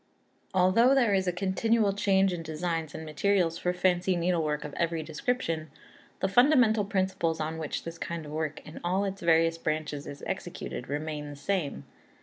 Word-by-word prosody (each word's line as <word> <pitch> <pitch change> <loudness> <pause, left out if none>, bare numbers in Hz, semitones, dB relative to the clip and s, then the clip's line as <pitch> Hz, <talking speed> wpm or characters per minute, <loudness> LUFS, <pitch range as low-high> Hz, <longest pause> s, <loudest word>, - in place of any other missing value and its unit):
Although 215 +9 +5
there 240 -6 +3
is 190 -1 +1
a - - +3
continual 200 +3 +1
change 195 -1 +3
in 175 - -4
designs 160 0 -3
and 160 - -6
materials 170 +1 +1
for 180 - 0
fancy 180 0 +1
needlework 165 -4 0
of 150 - -7
every 165 -1 -1
description, 160 -1 -2 0.5
the - - +2
fundamental 240 -1 +5
principles 190 -4 0
on 160 +1 -3
which 155 - -3
this 165 0 -7
kind 170 -2 -4
of 150 - -8
work 155 -1 -3
in 155 - -9
all 185 +3 +1
its 195 0 -4
various 165 -1 +3
branches 155 -2 -3
is 145 0 -9
executed 125 - -5
remain 150 0 -3
the 145 - -8
same. 165 0 -2
170 Hz, 170 wpm, -29 LUFS, 155-195 Hz, 0.5 s, Although